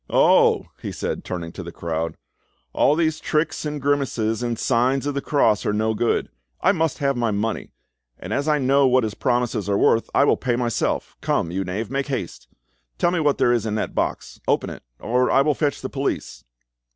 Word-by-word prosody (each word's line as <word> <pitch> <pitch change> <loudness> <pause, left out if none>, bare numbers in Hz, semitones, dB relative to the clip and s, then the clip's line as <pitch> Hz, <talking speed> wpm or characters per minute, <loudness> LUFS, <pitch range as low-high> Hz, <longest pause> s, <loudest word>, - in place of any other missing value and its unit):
"Oh!" - - +4 0.2
he - - -4
said, - - -4
turning 85 -2 -5
to 95 - -8
the 85 -1 -7
crowd, 80 -1 -3 0.6
"all 145 - +3
these 160 -1 +1
tricks 155 0 -1
and 150 0 -3
grimaces 130 -6 0
and 120 -2 -2
signs 130 +3 +1
of 145 - -1
the 140 - -2
cross 115 -9 +2
are 105 - 0
no 110 +1 +1
good. 115 +2 0 0.3
I 190 - +4
must 165 -6 0
have 140 -1 0
my 120 -1 0
money, 105 +2 -2 0.5
and 95 +4 -6
as 140 +4 -1
I 150 -1 +3
know 140 0 +3
what 130 -1 +3
his 110 -2 -2
promises 120 -3 -1
are 100 - +2
worth, 115 - +3
I - - +5
will - - +3
pay 125 -3 0
myself! 120 -3 -1
Come, 85 - 0
you 95 +2 -1
knave, 100 +5 -4
make 135 +1 -1
haste. 130 -11 -5 0.5
Tell 175 - +2
me 180 - 0
what 150 -3 +2
there 120 - +3
is 115 -2 0
in 105 - -1
that 110 - -2
box; - - -3
open - - +1
it, - - -9 0.2
or 125 +3 +1
I 135 - +4
will 150 +1 +2
fetch 145 0 -1
the 130 - -3
police." 135 - -3
125 Hz, 210 wpm, -22 LUFS, 110-140 Hz, 0.6 s, I